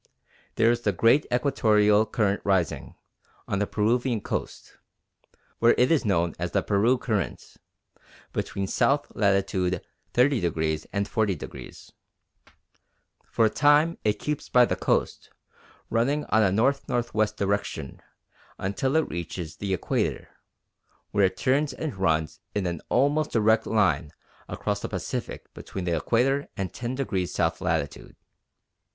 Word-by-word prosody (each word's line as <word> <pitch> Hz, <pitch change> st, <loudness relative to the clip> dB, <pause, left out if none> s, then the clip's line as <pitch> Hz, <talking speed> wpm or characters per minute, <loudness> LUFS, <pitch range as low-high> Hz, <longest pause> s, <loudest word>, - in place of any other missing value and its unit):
There 115 Hz, +1 st, +4 dB
is 120 Hz, 0 st, -1 dB
the 105 Hz, -3 st, 0 dB
great 115 Hz, -, +3 dB
Equatorial 110 Hz, -5 st, +3 dB
Current 105 Hz, -2 st, 0 dB
rising 95 Hz, -5 st, 0 dB, 0.5 s
on 100 Hz, -, -1 dB
the 105 Hz, -, 0 dB
Peruvian 120 Hz, +2 st, +1 dB
coast -, -, -5 dB, 0.8 s
(where 115 Hz, +1 st, +5 dB
it 125 Hz, +4 st, +3 dB
is 155 Hz, -6 st, +2 dB
known 85 Hz, -5 st, +1 dB
as -, -, -3 dB
the -, -, +1 dB
Peru 110 Hz, +5 st, +2 dB
Current) 110 Hz, -4 st, -3 dB, 0.8 s
between 100 Hz, -, -2 dB
south 140 Hz, +8 st, +1 dB
latitude 95 Hz, -3 st, +1 dB, 0.4 s
30° 85 Hz, -, +1 dB
and 100 Hz, 0 st, -1 dB
40°. 105 Hz, -7 st, -4 dB, 1.3 s
For 115 Hz, -, +1 dB
a -, -, +4 dB
time 150 Hz, +3 st, +3 dB
it 105 Hz, -1 st, +1 dB
keeps 150 Hz, +4 st, -4 dB
by 125 Hz, -1 st, +6 dB
the -, -, -1 dB
coast, -, -, -1 dB, 0.6 s
running 135 Hz, +6 st, +1 dB
in -, -, -10 dB
a 110 Hz, -1 st, +4 dB
N.N.W. 120 Hz, +1 st, +1 dB
direction 100 Hz, -8 st, -3 dB, 0.6 s
until 115 Hz, +9 st, -1 dB
it 160 Hz, -, +2 dB
reaches 85 Hz, -1 st, -6 dB
the 100 Hz, -1 st, -4 dB
Equator, 95 Hz, -, -1 dB, 0.8 s
where 100 Hz, -1 st, +3 dB
it 95 Hz, -, -1 dB
turns 140 Hz, +2 st, +1 dB
and 145 Hz, -1 st, -5 dB
runs 80 Hz, -4 st, 0 dB, 0.2 s
in 100 Hz, -2 st, 0 dB
an 85 Hz, -3 st, -3 dB
almost 145 Hz, +4 st, +2 dB
direct 110 Hz, 0 st, +3 dB
line 85 Hz, -9 st, +2 dB, 0.4 s
across -, -, -2 dB
the -, -, -5 dB
Pacific -, -, -5 dB
between 95 Hz, -2 st, -7 dB
the 85 Hz, -1 st, 0 dB
Equator 130 Hz, -, +1 dB
and 95 Hz, -2 st, -3 dB
10° 120 Hz, -7 st, -2 dB
south 85 Hz, +1 st, -1 dB
latitude. 80 Hz, -5 st, -2 dB
105 Hz, 130 wpm, -26 LUFS, 95-125 Hz, 1.3 s, by